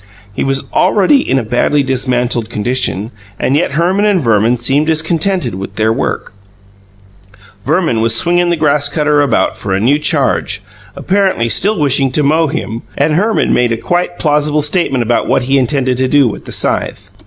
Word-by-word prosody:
He - - -3
was 135 0 -1
already 200 +8 +3
in 135 - -1
a 130 - -1
badly 125 +6 0
dismantled 125 -3 -1
condition, 115 -1 -2 0.3
and 135 - 0
yet 150 -2 0
Herman 180 +6 +1
and 205 -3 +2
Verman 115 -2 +1
seemed 135 +6 0
discontented 165 - 0
with 95 +1 -7
their 110 +1 +1
work: 120 -4 -4 1.3
Verman 155 -7 0
was 115 0 +2
swinging 175 +7 +2
the 170 - +1
grass 150 -2 +1
cutter 150 -1 +1
about 145 - 0
for 95 -2 -2
a - - -1
new 135 +8 +2
charge, - - 0 0.3
apparently 190 -12 0
still 200 - +2
wishing 135 -2 +2
to 150 - +1
mow 155 +3 +2
him, 120 -7 -5 0.2
and 150 +2 +1
Herman 210 +7 0
had - - +2
made 120 -1 +1
a 115 - -1
quite 175 +6 -2
plausible 150 0 +1
statement 150 -5 +1
about 115 0 -1
what - - +1
he 135 +2 +1
intended 130 -1 -1
to 130 - +1
do 140 -1 +3
with 110 - -6
the - - -8
scythe. - - -1
140 Hz, 180 wpm, -13 LUFS, 120-160 Hz, 1.3 s, already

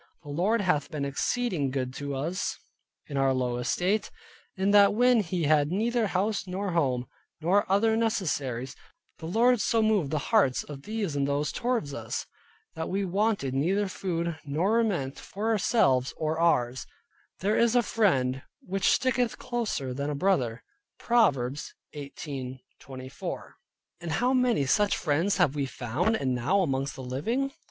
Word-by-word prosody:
The 145 - -11
Lord 195 +10 +1
hath 180 -7 +1
been 145 -2 -3
exceeding 155 - -1
good 130 -1 -3
to 140 -1 -4
us 165 +7 -2 0.5
in 140 - -5
our 135 -1 +3
low 125 -1 -1
estate, 180 - 0 0.5
in 195 +1 +2
that 205 0 +6
when 245 -1 +4
we 180 -3 0
had 150 0 +3
neither 225 +3 +1
house 195 +1 -1
nor 190 +1 -3
home, 130 -7 +1 0.3
nor 185 +5 +2
other 220 +3 +3
necessaries, 145 - -1 0.4
the 160 - -6
Lord 235 +5 +3
so 225 +3 +2
moved 210 -9 +2
the 155 - -1 0.2
hearts 190 - +4
of 145 -2 -9
these 205 -4 -3
and 140 -1 +1
those 145 +1 0
towards 235 - -1
us, - - -4 0.5
that 160 - -4
we 195 +1 -1
wanted 195 -7 0
neither 190 +9 +1
food, 170 -3 -3
nor 175 +11 +1
raiment 175 -13 -1
for 210 +3 -4
ourselves 185 - +2
or 155 +1 -1
ours: 130 -7 +1 0.5
"There 205 +3 +1
is 235 0 +3
a 245 - +5
Friend 135 - +1 0.2
which 195 +1 0
sticketh 250 -2 +1
closer 215 - -3
than 140 +3 -3
a 150 - -2
Brother" 135 -9 0 0.3
(Proverbs 150 - +1 0.2
18.24). 130 -2 -7 0.5
And 170 -2 -4
how 250 - +2
many 250 - +2
such 205 +9 +2
friends 165 +6 +1
have 175 -7 +3
we 140 -2 -1
found, 130 - -1
and 130 -9 0
now 140 +11 +1 0.4
living 135 - -2
amongst? 275 0 -3
170 Hz, 155 wpm, -28 LUFS, 140-215 Hz, 0.5 s, that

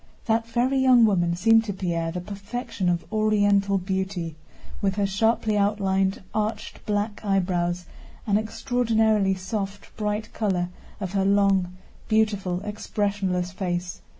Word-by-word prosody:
That 225 0 +1
very 245 +3 +1
young 255 -3 +6
woman 175 -5 +2
seemed 225 +5 +5
to 205 - -3
Pierre 170 -3 -2
the 180 +1 -4
perfection 200 0 -4
of 175 -1 0
Oriental 205 -2 +3
beauty, 190 -3 -3 0.5
with 195 -2 +1
her 200 -1 +1
sharply 215 +2 +1
outlined, 195 -2 +1
arched, 215 +1 -3
black 205 0 -1
eyebrows 180 -3 0 0.4
and 205 - +1
the - - +1
extraordinarily 220 -4 +1
soft, 195 +1 -5
bright 210 0 -2
color 185 -5 0 0.3
of 190 -3 -4
her 195 -1 +2
long, 195 -2 +2 0.3
beautiful, 205 -5 +1
expressionless 200 -3 -2
face. 180 -2 -3
200 Hz, 130 wpm, -25 LUFS, 185-215 Hz, 0.5 s, young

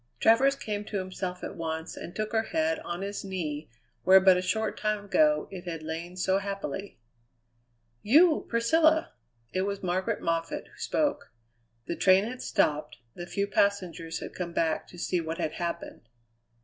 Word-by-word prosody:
Travers 265 +5 +5
came 210 -5 -4
to 210 - -3
himself 185 -1 -4
at - - -5
once, 160 -1 -4
and 175 - -8
took 215 0 -2
her 220 -1 +2
head 320 +6 0
on 185 - -5
his 200 +1 -4
knee 160 -6 -4 0.3
where 190 +2 +7
but 190 -1 +6
a 180 - +1
short 220 +5 -1
time 215 -1 -1
ago 300 +8 +3
it 185 -2 -8
had 165 -3 -5
lain 165 +3 -5
so 190 +1 +2
happily. 195 -2 -5 1.0
"You, 310 +8 +5
Priscilla!" 315 +7 +3 0.4
It 185 - +1
was 200 0 -2
Margaret 185 +1 0
Moffatt 165 0 -2
who - - -20
spoke. 300 -2 -1 0.5
The 170 - -3
train 190 +2 +5
had 250 +3 -5
stopped; 150 -4 0 0.2
the 175 0 -7
few 200 +2 -1
passengers 185 -5 0
had - - -7
come 175 -2 -5
back 165 -2 0
to 175 - -13
see 175 0 0
what 160 0 -4
had 165 -3 -1
happened. 170 -1 -4
190 Hz, 170 wpm, -28 LUFS, 170-220 Hz, 1.0 s, where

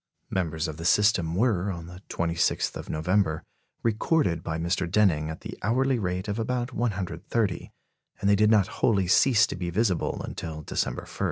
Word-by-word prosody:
Members 80 -4 -1
of 80 -1 -6
the 80 - -7
system 90 -4 +3
were, 105 -3 +1
on 85 -2 -6
the 90 +2 -11
26th 85 0 0
of - - -7
November, 80 0 0 0.4
recorded 110 - +1
by 80 -2 -3
Mr. 85 +2 -1
Denning 85 -6 +2
at 80 - -7
the - - -8
hourly 130 +4 +1
rate 90 0 -2
of 105 +2 -2
about 125 +2 -2
130; 100 -2 -2 0.5
and 100 - -1
they 100 - +5
did 105 +1 +4
not 105 -3 +5 0.2
wholly 100 -5 +3
cease 115 +5 +5
to - - -5
be 90 0 -3
visible 95 -1 0
until 80 -2 -6
December - - -2
1. - - -14
95 Hz, 175 wpm, -26 LUFS, 85-110 Hz, 0.5 s, they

